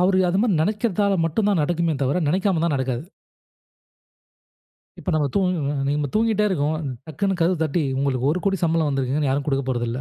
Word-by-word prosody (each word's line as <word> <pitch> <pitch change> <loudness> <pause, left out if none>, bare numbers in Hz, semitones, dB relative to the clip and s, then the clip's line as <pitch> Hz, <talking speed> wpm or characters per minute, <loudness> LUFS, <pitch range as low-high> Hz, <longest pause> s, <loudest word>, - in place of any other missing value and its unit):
அவரு 185 +1 +3
அது 180 +2 +1
மாரி 220 -3 +2
நெனைக்கிறதால 205 0 0
மட்டும் 165 +6 0
தான் 195 -5 +2
நடக்குமே 170 +1 0
தவிர, 135 +4 +1
நெனைக்காமருந்தா 170 -2 +1
நடக்காது. 130 +2 -2 1.9
இப்ப 185 - -3
நம்ம 150 -2 +2
தூங்குங்க 180 -7 0
நம்ம 145 0 0
தூங்கிட்டே 215 -1 +2
இருக்கோம். 155 -4 0 0.3
டக்குன்னு 190 +6 -1
கதவு 170 +2 +2
தட்டி, 160 +2 0 0.2
உங்களுக்கு 135 -1 0
10,00,000 195 +3 0
சம்பளம் 165 -2 +2
வந்திருக்குன்னு 135 +1 0
யாரும் 140 +1 0
குடுக்க 140 -2 0
போறதில்ல! 120 -2 -2
160 Hz, 155 wpm, -22 LUFS, 140-190 Hz, 1.9 s, அவரு